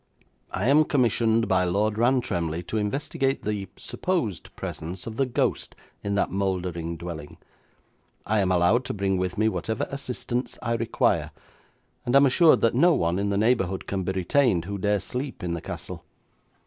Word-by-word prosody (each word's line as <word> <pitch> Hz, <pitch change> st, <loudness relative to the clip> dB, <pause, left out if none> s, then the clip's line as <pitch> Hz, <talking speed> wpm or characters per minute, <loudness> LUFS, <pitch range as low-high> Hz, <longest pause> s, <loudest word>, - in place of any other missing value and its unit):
I 100 Hz, +5 st, -2 dB
am 150 Hz, +3 st, +5 dB
commissioned 115 Hz, -4 st, +2 dB
by 95 Hz, -2 st, +3 dB
Lord 105 Hz, +4 st, +1 dB
Rantremly 90 Hz, -10 st, +1 dB
to 110 Hz, -, -3 dB
investigate 135 Hz, +5 st, -1 dB
the 105 Hz, -2 st, -2 dB
supposed 130 Hz, -, -2 dB
presence 85 Hz, +3 st, -6 dB
of 115 Hz, -1 st, -7 dB
the 135 Hz, -, +2 dB
ghost 125 Hz, -, -1 dB, 0.3 s
in 100 Hz, 0 st, -1 dB
that 100 Hz, -, +1 dB
mouldering 90 Hz, -4 st, -2 dB
dwelling. 80 Hz, -3 st, -7 dB, 0.9 s
I 110 Hz, 0 st, +1 dB
am 95 Hz, -2 st, +2 dB
allowed 90 Hz, +8 st, +3 dB
to -, -, -3 dB
bring 95 Hz, -1 st, 0 dB
with 90 Hz, 0 st, -2 dB
me 110 Hz, +1 st, +3 dB
whatever 110 Hz, 0 st, -1 dB
assistants 125 Hz, -2 st, -3 dB
I 115 Hz, -1 st, 0 dB
require, 115 Hz, 0 st, +1 dB, 0.7 s
and 120 Hz, -, 0 dB
am 140 Hz, +1 st, +7 dB
assured 155 Hz, +5 st, +5 dB
that 115 Hz, -, +3 dB
no 170 Hz, +8 st, +5 dB
one 85 Hz, +2 st, 0 dB
in 100 Hz, 0 st, 0 dB
the 100 Hz, -, 0 dB
neighbourhood 100 Hz, -4 st, +1 dB
can 95 Hz, -1 st, -2 dB
be 95 Hz, +1 st, -2 dB
retained 95 Hz, -1 st, +2 dB
who 100 Hz, +1 st, -4 dB
dare 105 Hz, +1 st, +1 dB
sleep 130 Hz, -2 st, -5 dB
in 85 Hz, -1 st, -2 dB
the 85 Hz, -, -4 dB
castle. -, -, -7 dB
105 Hz, 170 wpm, -25 LUFS, 90-120 Hz, 0.9 s, am